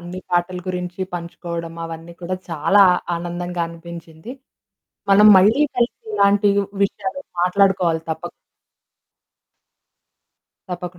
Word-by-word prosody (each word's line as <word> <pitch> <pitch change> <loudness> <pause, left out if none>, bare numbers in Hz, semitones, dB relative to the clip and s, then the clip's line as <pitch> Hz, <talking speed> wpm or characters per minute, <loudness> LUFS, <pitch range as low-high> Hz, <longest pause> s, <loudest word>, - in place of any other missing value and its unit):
అన్ని 175 +2 -8
పాటల 175 +1 0
గురించి 180 0 -5
పంచుకోవడం, 170 -1 -6
అవన్నీ 165 +1 -8
కూడా 185 +2 -3
చాలా 180 +6 +4 0.3
ఆనందంగా 175 0 -4
అనిపించింది. 170 +4 -10 0.8
మనం 210 +2 +7
మళ్ళీ 210 +9 +5 0.2
కలిసి 240 0 +1 0.2
ఇలాంటి 200 - +3 0.4
విషయాలు 255 +7 -4 0.2
మాట్లాడుకోవాలి 180 -3 +2
తప్పక్... 160 +2 -5 2.4
తప్పకుండా. 180 0 -6
175 Hz, 95 wpm, -20 LUFS, 170-195 Hz, 2.4 s, మనం